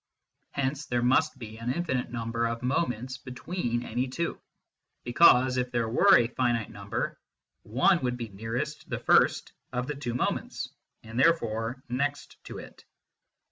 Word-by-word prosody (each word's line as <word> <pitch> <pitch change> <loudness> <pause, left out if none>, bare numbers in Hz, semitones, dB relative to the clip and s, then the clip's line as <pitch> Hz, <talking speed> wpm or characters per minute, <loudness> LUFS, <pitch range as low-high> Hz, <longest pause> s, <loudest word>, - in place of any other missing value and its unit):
Hence 140 +2 -2
there 120 -1 0
must 135 +4 +3
be 110 -3 -9
an 115 +2 -1
infinite 130 -5 -1
number 115 0 -1
of 115 +1 -4
moments 130 -2 -1
between 125 -2 -3
any 125 +4 -1
two; 170 +7 -3 0.6
because 130 -1 +5
if 125 0 0
there 120 -2 0
were 115 - +6
a 120 - +3
finite 120 -3 0
number 100 0 -4 0.4
one - - +3
would 125 -1 -1
be 115 -2 -5
nearest 115 +9 -4
the - - -2
first - - +3 0.2
of 125 0 -2
the 150 - -3
two 120 -4 -4
moments, - - -2 0.3
and 110 +2 -5
therefore 120 -5 +1
next 140 +4 -3
to - - -7
it. - - -11
125 Hz, 150 wpm, -28 LUFS, 115-130 Hz, 0.6 s, were